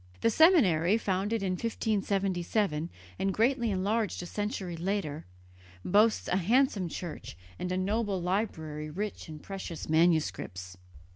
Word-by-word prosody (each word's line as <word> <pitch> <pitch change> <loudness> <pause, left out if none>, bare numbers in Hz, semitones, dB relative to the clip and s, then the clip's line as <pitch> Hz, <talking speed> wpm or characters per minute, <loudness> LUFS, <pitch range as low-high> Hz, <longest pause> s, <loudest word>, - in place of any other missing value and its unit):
The 230 - +3
seminary, 215 - +5
founded 205 +1 -1
in 190 - 0
1577 195 -5 -1 0.3
and 195 - +1
greatly 235 +1 +2
enlarged 205 +1 -1
a - - -6
century 205 -2 -3
later, 165 - -3 0.6
boasts 210 +4 +3
a 180 - +1
handsome 205 -1 +2
church 160 - -7 0.2
and 180 - -3
a 185 - 0
noble 200 +1 0
library 160 -5 -2
rich 200 +2 -5
in 155 - -7
precious 185 0 -7
manuscripts. 155 - +1
190 Hz, 125 wpm, -30 LUFS, 170-215 Hz, 0.6 s, seminary